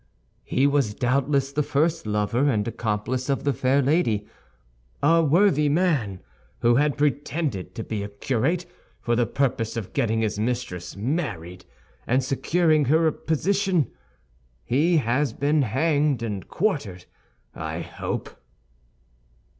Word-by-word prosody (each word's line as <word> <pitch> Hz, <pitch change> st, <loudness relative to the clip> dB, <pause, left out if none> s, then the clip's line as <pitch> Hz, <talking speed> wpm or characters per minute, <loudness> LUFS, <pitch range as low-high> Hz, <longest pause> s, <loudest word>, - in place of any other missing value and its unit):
"He 130 Hz, -, +1 dB
was 140 Hz, -7 st, +2 dB
doubtless 135 Hz, +2 st, +1 dB
the 145 Hz, +2 st, 0 dB
first 150 Hz, 0 st, 0 dB
lover 105 Hz, +6 st, +1 dB
and 105 Hz, -5 st, 0 dB
accomplice 115 Hz, +4 st, -2 dB
of 135 Hz, -, 0 dB
the 140 Hz, -1 st, +1 dB
fair 130 Hz, +4 st, +2 dB
lady. 125 Hz, -8 st, +1 dB, 0.8 s
A 165 Hz, +3 st, +5 dB
worthy 155 Hz, -1 st, +3 dB
man, 145 Hz, -, +1 dB, 0.4 s
who 120 Hz, 0 st, +4 dB
had 145 Hz, 0 st, +2 dB
pretended 145 Hz, -, -1 dB
to 115 Hz, -, -4 dB
be 110 Hz, -2 st, -4 dB
a 100 Hz, -, -5 dB
curate 135 Hz, -, -1 dB, 0.3 s
for 120 Hz, -1 st, 0 dB
the 120 Hz, -1 st, +2 dB
purpose 120 Hz, -4 st, -1 dB
of 110 Hz, -5 st, -5 dB
getting 115 Hz, -5 st, +1 dB
his 110 Hz, -1 st, -1 dB
mistress 115 Hz, -6 st, -3 dB
married, 100 Hz, -, -3 dB, 0.4 s
and 130 Hz, +3 st, +2 dB
securing 155 Hz, +3 st, +2 dB
her 160 Hz, +5 st, +3 dB
a 160 Hz, -, +4 dB
position. 185 Hz, -, 0 dB, 0.7 s
He 155 Hz, -, +2 dB
has 130 Hz, -1 st, +1 dB
been 145 Hz, +3 st, +1 dB
hanged 145 Hz, +1 st, +1 dB
and 105 Hz, -4 st, -4 dB
quartered, 140 Hz, -, -2 dB, 0.5 s
I 80 Hz, +1 st, -4 dB
hope." 80 Hz, 0 st, -5 dB
135 Hz, 130 wpm, -24 LUFS, 110-150 Hz, 0.8 s, A